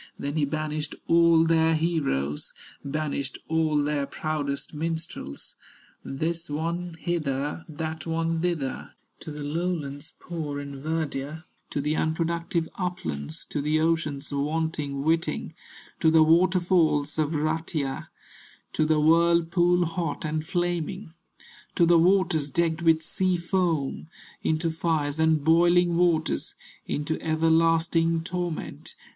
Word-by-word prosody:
Then 140 Hz, +1 st, -3 dB
he 150 Hz, -2 st, +2 dB
banished 155 Hz, 0 st, -3 dB
all 170 Hz, -1 st, +5 dB
their 160 Hz, 0 st, +3 dB
heroes, 140 Hz, -, -1 dB, 0.3 s
Banished 140 Hz, -1 st, -3 dB
all 160 Hz, -1 st, +1 dB
their 145 Hz, -1 st, -1 dB
proudest 145 Hz, -2 st, -3 dB
minstrels, 160 Hz, -, -5 dB, 0.5 s
This 165 Hz, +4 st, -3 dB
one 170 Hz, +3 st, -3 dB
hither, 150 Hz, -3 st, -2 dB
that 160 Hz, +1 st, -5 dB
one 165 Hz, 0 st, 0 dB
thither, 165 Hz, -7 st, -2 dB, 0.2 s
To -, -, -9 dB
the 150 Hz, -1 st, -6 dB
lowlands 150 Hz, -2 st, -3 dB
poor 155 Hz, -5 st, -4 dB
in 140 Hz, -1 st, -7 dB
verdure, 155 Hz, -1 st, -3 dB, 0.3 s
To 145 Hz, -, -2 dB
the 150 Hz, +2 st, 0 dB
unproductive 165 Hz, +1 st, -1 dB
uplands, 80 Hz, -, -4 dB
To 145 Hz, -, -1 dB
the 155 Hz, +2 st, +1 dB
oceans 155 Hz, -3 st, 0 dB
wanting 150 Hz, -1 st, -1 dB
whiting, 165 Hz, +2 st, 0 dB, 0.5 s
To 160 Hz, -, +4 dB
the 160 Hz, 0 st, +6 dB
waterfalls 165 Hz, -3 st, +3 dB
of 155 Hz, +1 st, +1 dB
Rutya, 155 Hz, -2 st, -2 dB, 0.7 s
To 155 Hz, -, +2 dB
the 155 Hz, -1 st, +3 dB
whirlpool 170 Hz, +2 st, +4 dB
hot 165 Hz, -3 st, -3 dB
and 155 Hz, 0 st, -1 dB
flaming, 175 Hz, +1 st, -2 dB, 0.6 s
To 170 Hz, -, +5 dB
the 170 Hz, 0 st, +5 dB
waters 170 Hz, -4 st, +3 dB
decked 165 Hz, +3 st, 0 dB
with 160 Hz, -1 st, +4 dB
sea 185 Hz, +2 st, +1 dB
foam, 170 Hz, -5 st, -1 dB, 0.3 s
Into 160 Hz, +1 st, 0 dB
fires 160 Hz, -2 st, -1 dB
and 160 Hz, -2 st, +3 dB
boiling 175 Hz, +2 st, +4 dB
waters, 165 Hz, -, +1 dB, 0.3 s
Into 150 Hz, +2 st, -2 dB
everlasting 165 Hz, +1 st, +2 dB
torment. 175 Hz, -2 st, -4 dB
160 Hz, 120 wpm, -26 LUFS, 150-170 Hz, 0.7 s, the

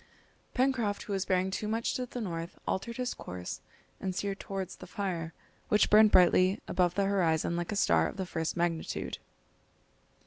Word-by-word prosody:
Pencroft, 245 Hz, -6 st, +1 dB
who 205 Hz, -, -4 dB
was 195 Hz, -1 st, 0 dB
bearing 185 Hz, 0 st, +1 dB
too 210 Hz, +2 st, -3 dB
much 225 Hz, +2 st, 0 dB
to 250 Hz, -1 st, -3 dB
the 245 Hz, -, -6 dB
north, 170 Hz, -4 st, -4 dB
altered 235 Hz, +5 st, -2 dB
his 250 Hz, -1 st, -1 dB
course 90 Hz, 0 st, -7 dB, 0.4 s
and 190 Hz, -1 st, -3 dB
steered 200 Hz, 0 st, -2 dB
towards 195 Hz, -2 st, -5 dB
the 180 Hz, -, -10 dB
fire, 175 Hz, -5 st, -3 dB, 0.4 s
which 210 Hz, -, +3 dB
burned 215 Hz, +1 st, +8 dB
brightly 185 Hz, +1 st, +5 dB
above 180 Hz, -1 st, +1 dB
the 200 Hz, -, +2 dB
horizon 170 Hz, -4 st, +1 dB
like 175 Hz, +2 st, -2 dB
a -, -, -1 dB
star 205 Hz, -, +3 dB
of -, -, -7 dB
the 190 Hz, -, -2 dB
first 160 Hz, -2 st, -3 dB
magnitude. 170 Hz, -1 st, -2 dB
190 Hz, 175 wpm, -30 LUFS, 175-210 Hz, 0.4 s, burned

